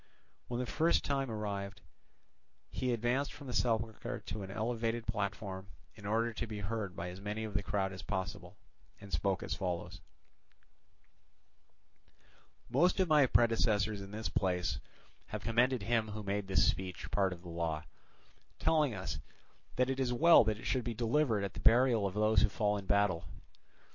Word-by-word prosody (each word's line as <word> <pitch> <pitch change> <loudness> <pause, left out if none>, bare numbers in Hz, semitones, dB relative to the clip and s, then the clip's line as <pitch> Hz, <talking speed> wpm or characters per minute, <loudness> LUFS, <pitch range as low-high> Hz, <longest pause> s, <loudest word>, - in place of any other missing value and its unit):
When 120 0 -3
the 125 - -1
proper 165 +7 +2
time 135 -2 -1
arrived, 100 -3 -4 0.9
he 130 -1 -1
advanced 120 +4 0
from 145 - -11
the 125 - -5
sepulchre 115 -2 -1
to 105 - -5
an 95 - -6
elevated 115 +2 -2
platform 100 -3 -3 0.3
in 100 0 -9
order 115 +2 +1
to 115 - -4
be 105 -2 -5
heard 100 -3 -3
by 90 0 -4
as 90 +2 -9
many 105 +2 -3
of 110 -2 -5
the 100 - +1
crowd 95 -1 -1
as 95 - -7
possible, 95 +1 -4 0.4
and 100 -3 -11
spoke 95 +4 0
as - - -3
follows: 90 -3 -3 2.7
"Most 175 +11 +3
of 185 -3 +2
my 150 -3 +6
predecessors 110 -4 +2
in 95 - -8
this 110 +2 -4
place 90 -3 0 0.5
have 105 -1 -5
commended 120 0 +2
him 115 0 +1
who 105 0 -6
made 100 0 -2
this 95 - +4
speech 95 -1 -3
part 95 -2 +2
of 90 -1 -8
the 90 - -9
law, 85 -2 -2 0.7
telling 150 -7 +2
us 95 -1 -4 0.6
that 125 +1 +2
it 135 - -3
is 130 -2 +1
well 165 +6 +7
that 110 -1 0
it - - -10
should 130 -2 0
be 115 -1 -3
delivered 115 -2 +1
at 100 -1 -3
the - - -7
burial 115 -3 +4
of 95 - -6
those 110 +1 +4
who - - +4
fall 105 -1 +1
in 100 -2 -5
battle. 100 -4 +2
105 Hz, 175 wpm, -33 LUFS, 100-120 Hz, 2.7 s, well